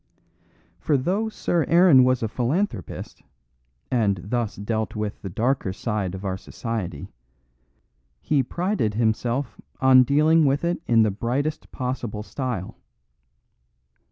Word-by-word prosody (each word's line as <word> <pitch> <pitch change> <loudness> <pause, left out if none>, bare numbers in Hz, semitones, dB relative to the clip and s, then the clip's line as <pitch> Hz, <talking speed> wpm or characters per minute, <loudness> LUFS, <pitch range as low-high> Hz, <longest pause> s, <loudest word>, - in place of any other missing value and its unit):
For 150 - +1
though 190 +11 0
Sir 175 -6 0
Aaron 170 -6 +6
was 130 -1 +2
a - - +1
philanthropist, 125 - -3 0.7
and 105 -6 +1
thus 115 +1 -2
dealt 110 +1 -3
with 105 -1 -4
the 95 - -5
darker 115 +2 0
side 100 -2 -3
of 95 +2 -8
our 95 -1 -2
society, 95 - -5 1.1
he 145 - +1
prided 170 - -1
himself 115 +2 -1 0.2
on 130 -1 +7
dealing 155 +5 +4
with 140 +1 +2
it 170 -1 -1
in 115 -2 +5
the 110 - +2
brightest 130 +9 -2
possible 125 -4 -4
style. 125 -6 -5
120 Hz, 125 wpm, -24 LUFS, 105-145 Hz, 1.1 s, on